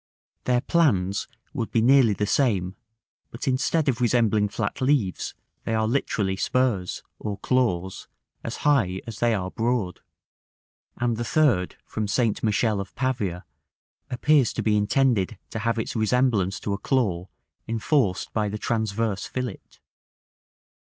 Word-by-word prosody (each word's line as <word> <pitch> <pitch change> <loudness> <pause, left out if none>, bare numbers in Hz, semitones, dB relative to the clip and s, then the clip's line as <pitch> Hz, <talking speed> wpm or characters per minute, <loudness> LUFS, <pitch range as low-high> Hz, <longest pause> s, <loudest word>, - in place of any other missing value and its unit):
Their 125 -1 +2
plans 100 - +1 0.3
would 120 -7 -3
be 115 - +1
nearly 125 -1 +5
the 105 - -1
same; 100 -7 +1 0.5
but 120 +5 -7
instead 140 +4 +1
of 130 -2 +1
resembling 110 -3 +2
flat 100 +3 -3
leaves, 130 -9 0 0.3
they 110 - -1
are 110 0 +1
literally 110 -6 0
spurs, 120 -4 0 0.2
or 105 -2 -4
claws, 95 -9 0 0.4
as - - -4
high 110 -11 +2
as 115 -2 -8
they 120 -1 +3
are 95 -2 -3
broad; 115 -6 -1 1.0
and 120 -1 0
the 120 - -2
third, 120 - +2
from 110 -1 -3
St. 115 0 +1
Michele 110 -1 +1
of 100 - -10
Pavia, 105 -9 -2 0.6
appears 135 0 +3
to - - -2
be 105 -1 +2
intended 105 -1 +2
to 115 - -3
have 115 +1 0
its 110 - -3
resemblance 110 -4 +1
to 100 - -2
a 100 - -3
claw 100 -9 0 0.4
enforced 115 - 0
by 105 -2 0
the 105 - -4
transverse 110 -2 -1
fillet. 125 -5 -4
110 Hz, 140 wpm, -25 LUFS, 100-125 Hz, 1.0 s, nearly